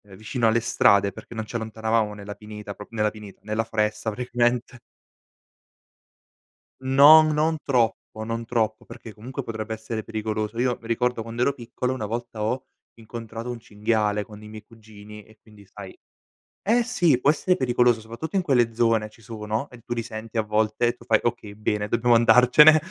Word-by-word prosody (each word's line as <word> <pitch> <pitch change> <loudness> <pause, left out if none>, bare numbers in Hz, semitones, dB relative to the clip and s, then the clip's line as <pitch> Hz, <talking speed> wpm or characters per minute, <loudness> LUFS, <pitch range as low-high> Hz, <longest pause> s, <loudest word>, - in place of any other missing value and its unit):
vicino 115 +4 -1
alle 115 +1 +2
strade 100 -2 +3
perché 95 - -12
non 110 -1 -4
ci 115 - -10
allontanavamo 110 -1 -1
nella 105 0 -8
pineta, 105 0 -9
proprio 105 +2 -12
nella 105 -1 +2
pineta, 105 -2 -12
nella 110 +2 -2
foresta 110 0 -1
praticamente 120 +1 -1 2.0
No, 140 +4 +8
non 155 +1 +1
troppo, 115 -4 -1
non 115 +1 -4
troppo, 110 -2 -1
perché 110 - -11
comunque, 120 +5 -7
potrebbe 110 0 -5
essere 110 0 -5
pericoloso. 110 0 -4
Io 125 -1 +1
mi 115 - -11
ricordo 125 0 0
quando 115 +1 -5
ero 135 - +3
piccolo, 125 0 -4
una 110 -5 -4
volta 115 0 -5
ho 125 +5 -2 0.3
incontrato 115 +1 -7
un 120 - -7
cinghiale, 105 -1 -1
con 105 -1 -13
i 105 - -11
miei 110 0 -10
cugini 105 -1 -14
e 110 0 -21
quindi 105 -2 -18
sai 95 -1 -11 0.6
eh 235 +4 +2
sì! 180 - +2
Può 140 - +4
essere 180 +4 +2
pericoloso, 120 -2 +2
soprattutto 115 - -7
in 195 - +3
quelle 125 -8 +2
zone 115 -2 +2
ci 110 - -21
sono, 110 +4 -4
e 125 - -14
tu 120 - -3
li 115 - -3
senti 110 +1 -7
a - - +4
volte, 110 +2 0
e 120 - +1
tu 115 - -18
fai: 110 -3 +3
"Okay 110 -3 -3
bene 105 -1 -2
dobbiamo 120 +2 +3
andarcene". 125 +6 +7
115 Hz, 180 wpm, -24 LUFS, 110-120 Hz, 2.0 s, No